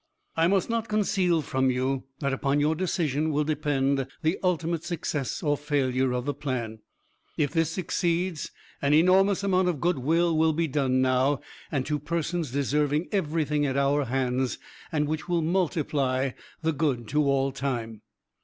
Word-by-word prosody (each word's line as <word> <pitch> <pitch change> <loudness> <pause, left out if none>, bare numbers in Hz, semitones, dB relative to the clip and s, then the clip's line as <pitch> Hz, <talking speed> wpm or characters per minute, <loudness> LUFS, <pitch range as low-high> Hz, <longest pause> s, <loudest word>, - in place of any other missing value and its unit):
"I 165 +1 +3
must 195 0 +2
not 230 -1 -1
conceal 190 -6 +1
from 130 -1 +1
you 130 +1 -1 0.2
that 140 -1 0
upon 140 +1 +1
your 150 +2 +2
decision 160 -4 0
will 150 0 +1
depend 140 -3 0 0.2
the 160 +3 +1
ultimate 170 -2 0
success 160 -6 -3
or 145 -2 +2
failure 135 -3 0
of 125 0 -2
the 145 - -1
plan.... 125 -6 -4 0.6
If 145 -3 +1
this 165 -1 +1
succeeds, 170 -1 -1 0.3
an 140 +1 +3
enormous 190 +4 +4
amount 185 -2 +2
of 170 -5 0
good 170 -2 +1
will 160 +2 +2
be 165 +1 0
done 130 -2 +1
now, 130 +2 +2 0.3
and 135 -4 -1
to 150 -1 -1
persons 165 +1 -2
deserving 145 +4 0
everything 155 -5 0
at 135 0 -1
our 140 +1 +2
hands; 130 0 0 0.3
and 150 -2 +1
which 155 +2 -3
will 170 -2 +1
multiply 150 -7 0 0.3
the 160 0 +1
good 135 -6 -1
to 150 +4 +2
all 135 -1 +2
time." 120 -5 -3
150 Hz, 160 wpm, -27 LUFS, 135-165 Hz, 0.6 s, enormous